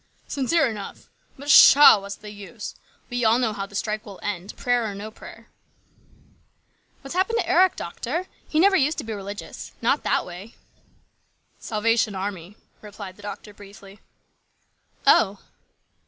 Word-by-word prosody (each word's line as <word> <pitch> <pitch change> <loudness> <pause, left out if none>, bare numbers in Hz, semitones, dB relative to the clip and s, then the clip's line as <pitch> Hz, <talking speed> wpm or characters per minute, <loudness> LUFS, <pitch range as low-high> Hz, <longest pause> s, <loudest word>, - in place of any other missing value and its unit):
"Sincere 290 +3 +1
enough. 210 -4 -8 0.3
But 285 +2 -11
pshaw! 285 -5 +9
What's 200 0 -7
the 210 - -11
use? 205 +2 -9 0.4
We 245 0 -1
all 225 +1 +4
know 235 -4 0
how 200 -1 -5
the 200 - -14
strike 215 +1 -2
will 200 -5 -11
end, 195 -1 -5
prayer 245 -1 +1
or 200 - -7
no 210 +2 -7
prayer." - - -13 1.5
"What's 275 - -8
happened 380 +6 +1
to - - -1
Eric, 370 +1 +4
doctor? 355 +2 -4 0.2
He 310 - +1
never 390 +3 +5
used 300 -1 +2
to - - -3
be 225 - -5
religious. 200 0 -8
Not - - +1
that - - 0
way." 180 +6 -10 0.5
" - - -44
Salvation 225 -1 +1
Army," 190 0 -6 0.2
replied 205 -3 -10
the 205 - -16
doctor 205 +1 -8
briefly. 200 0 -14 0.6
" - - -36
Oh 200 0 +4
215 Hz, 155 wpm, -24 LUFS, 200-250 Hz, 1.5 s, pshaw